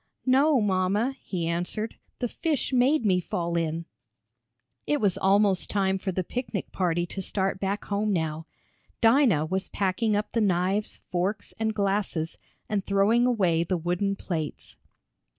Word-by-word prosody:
"No, 270 +2 +4
mamma," 205 +6 +1
he 175 -4 -3
answered. 175 +6 -2 0.2
"The 245 - -1
fish 295 0 -2
made 255 +1 +3
me 185 -3 +3
fall 170 -1 -2
in." 165 0 -1 1.0
It 295 - +2
was 200 -5 +2
almost 195 0 +3
time 190 -1 +1
for 190 0 -2
the 185 +1 -1
picnic 240 -1 -4
party 175 -2 0
to 190 +2 -4
start 190 0 -1
back 200 +1 -2
home 205 +1 0
now. 160 -3 -2 0.5
Dinah 225 - +4
was 190 +4 -2
packing 205 +3 0
up 210 +1 -2
the 230 - +1
knives, 190 +1 0
forks, 185 +4 -1
and 220 -1 0
glasses, 195 -5 -1 0.3
and 205 -2 -1
throwing 205 +5 +3
away 180 -9 +2
the 180 +2 -1
wooden 180 +4 -1
plates. 160 -6 -5
195 Hz, 150 wpm, -27 LUFS, 175-215 Hz, 1.0 s, No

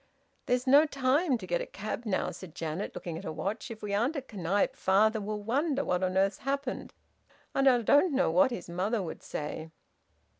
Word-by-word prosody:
"There's 250 0 +1
no 285 +4 +6
time 275 +1 +2
to 200 - -8
get 175 -1 0
a - - -5
cab, 215 +4 -5
now," 190 - 0
said 175 -4 -10
Janet, 165 +3 -4
looking 165 -2 -5
at - - -10
her 160 - -4
watch. 195 +11 -4
"If 220 -2 -9
we 205 -1 -3
aren't 240 +10 +1
at 270 -5 -6
Knype, 195 +1 0
father 215 +3 +3
will 210 0 -4
wonder 280 +5 0
what 180 0 0
on 185 0 0
earth's 195 0 +2
happened, 275 0 -3 0.6
and 275 0 +3
I 245 -3 +5
don't 290 - +5
know 275 -11 +3
what 180 +8 +5
his 195 -9 -6
mother 190 +5 -1
would 165 - -6
say!" 155 +2 -5
210 Hz, 200 wpm, -30 LUFS, 185-260 Hz, 0.6 s, no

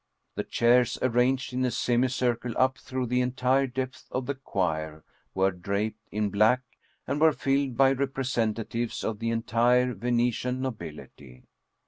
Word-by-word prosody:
The - - -3
chairs 120 +1 +3
arranged 130 +1 +1
in 130 +1 0
a 125 - +2
semicircle 120 0 0
up 130 0 +2
through 130 -1 -3
the 125 +1 +1
entire 130 +2 +1
depth 130 +1 -5
of 130 0 -3
the 140 - -1
choir 80 - -3 0.3
were 95 +1 +3
draped 100 +4 -3
in 105 -1 -1
black, 110 +6 +3 0.4
and 140 +3 -2
were 160 0 +7
filled 135 -3 0
by 135 0 +5
representatives 120 -4 -2
of 110 -2 -2
the 115 - -1
entire 120 +2 +2
Venetian 120 +3 0
nobility. 75 - -7
125 Hz, 140 wpm, -27 LUFS, 110-130 Hz, 0.4 s, were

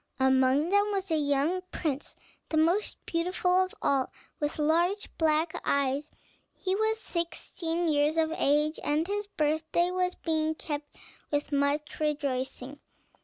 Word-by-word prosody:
Among 265 +3 +3
them 405 +2 +3
was 390 -2 -2
a - - +4
young 290 +5 +1
prince, 295 -3 -3 0.3
the 315 - 0
most 340 +7 +2
beautiful 360 +2 +2
of 370 - -7
all, 270 -2 +2 0.3
with 295 0 -2
large 340 +7 +1
black 315 0 +2
eyes; 280 +1 0 0.5
he 375 -1 -1
was 440 +1 +1
sixteen 335 -1 -2
years 300 +1 +2
of 320 -1 +2
age, 300 +2 +2
and 300 +2 +1
his 410 +2 -2
birthday 315 +1 0
was 365 0 0
being 315 -1 -1
kept 295 -1 -6 0.3
with 290 0 -1
much 285 +1 0
rejoicing. 280 -2 -2
315 Hz, 135 wpm, -29 LUFS, 290-355 Hz, 0.5 s, a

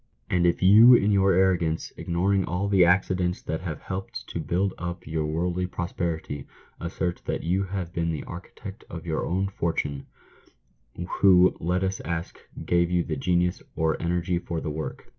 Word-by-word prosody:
And 90 -1 +3
if 85 - 0
you, 110 +6 +9
in 105 -2 +3
your 95 -1 +4
arrogance, 85 -3 +1
ignoring 95 +3 0
all 90 +4 -2
the 100 -2 +5
accidents 90 0 +2
that 80 - -3
have 80 -5 -5
helped 95 +1 -6
to - - -4
build 95 +2 0
up 85 0 -5
your 80 0 -2
worldly 90 +3 -1
prosperity, 85 -5 -4 0.3
assert 90 +1 -3
that - - -3
you 95 +4 0
have 95 -3 -5
been 85 0 -1
the 75 - -4
"architect 95 +3 -9
of 85 -1 -8
your 80 -2 -1
own 95 +2 0
fortune," 80 -7 -3 1.1
who, 90 -2 +6
let 90 +3 0
us 95 0 -1
ask, 85 0 -5 0.3
gave 85 0 +2
you 90 -1 +1
the 80 - -3
genius 90 +4 0
or 80 -1 +1
energy 85 +1 0
for 85 -1 -4
the 80 - -4
work 80 +1 -6
90 Hz, 170 wpm, -26 LUFS, 85-95 Hz, 1.1 s, you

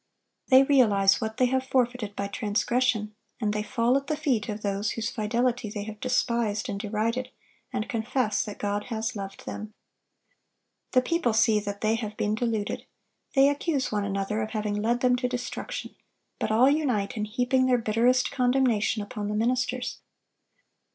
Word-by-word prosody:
They 260 0 +7
realize 210 -8 +4
what 220 0 -3
they 255 - +4
have 260 +1 +1
forfeited 245 -5 0
by 200 - -2
transgression, 215 +1 0 0.3
and 210 -3 0
they 210 - -1
fall 230 +3 +1
at 275 0 -5
the 305 - -1
feet 235 -9 0
of 210 0 -5
those 200 +1 -1
whose 230 +2 -3
fidelity 235 +1 0
they 205 0 -4
have 215 0 -8
despised 235 -4 0
and 200 -1 -3
derided, 225 +4 -1 0.4
and 215 - -2
confess 230 0 0
that 210 -2 -7
God 205 0 -2
has 225 +1 -3
loved 195 -1 -7
them. 215 0 -7 1.2
The 255 -1 +5
people 335 -5 +1
see 220 -1 +4
that 200 -1 -5
they 215 0 +2
have 215 -2 -5
been 210 - 0
deluded. 220 -2 -2 0.5
They 270 0 +6
accuse 285 -1 0
one 210 -1 0
another 200 +2 -1
of 215 - -3
having 210 -2 -2
led 240 +3 +1
them 250 -1 +4
to 250 0 0
destruction; 250 - -5 0.5
but - - -1
all 235 +4 +5
unite 260 -9 +1
in 210 -1 -1
heaping 250 +4 +1
their 250 -1 +4
bitterest 240 +3 +2
condemnation 245 -5 +2
upon 205 -1 -5
the 210 - -2
ministers. 250 +2 -1
225 Hz, 170 wpm, -27 LUFS, 210-250 Hz, 1.2 s, They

